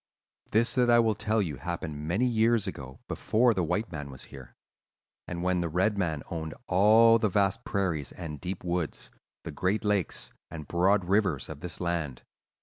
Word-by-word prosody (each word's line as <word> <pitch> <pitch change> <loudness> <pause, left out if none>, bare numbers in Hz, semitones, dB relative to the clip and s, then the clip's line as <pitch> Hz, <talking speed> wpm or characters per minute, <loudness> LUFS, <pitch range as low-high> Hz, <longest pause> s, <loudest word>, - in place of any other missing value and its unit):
"This 115 +2 +2
that 125 -1 +2
I 120 - +6
will 115 -2 +4
tell 105 +1 0
you 75 -7 -4
happened 75 -1 -5
many 100 +10 +1
years 115 -2 +2
ago, 65 -1 -7
before 120 +2 +2
the 95 - 0
white 105 +7 -1
man 75 -3 -6
was 65 -1 -10
here, 65 -2 -11 0.7
and 85 0 -4
when 90 -1 +1
the 85 - -2
red 95 +6 +1
man 80 -7 -1
owned 80 -2 -4
all 110 +4 +6
the 110 - +1
vast 100 +4 +1
prairies 85 -8 -1
and 75 -5 -7
deep 90 +1 -5
woods, 85 -3 -3 0.3
the - - -6
great 100 +4 -1
lakes 95 -12 0 0.2
and 75 -3 -8
broad 95 +2 +2
rivers 95 -6 +1
of 75 -2 -7
this 85 +2 -6
land. 85 -7 -2
90 Hz, 180 wpm, -28 LUFS, 80-105 Hz, 0.7 s, I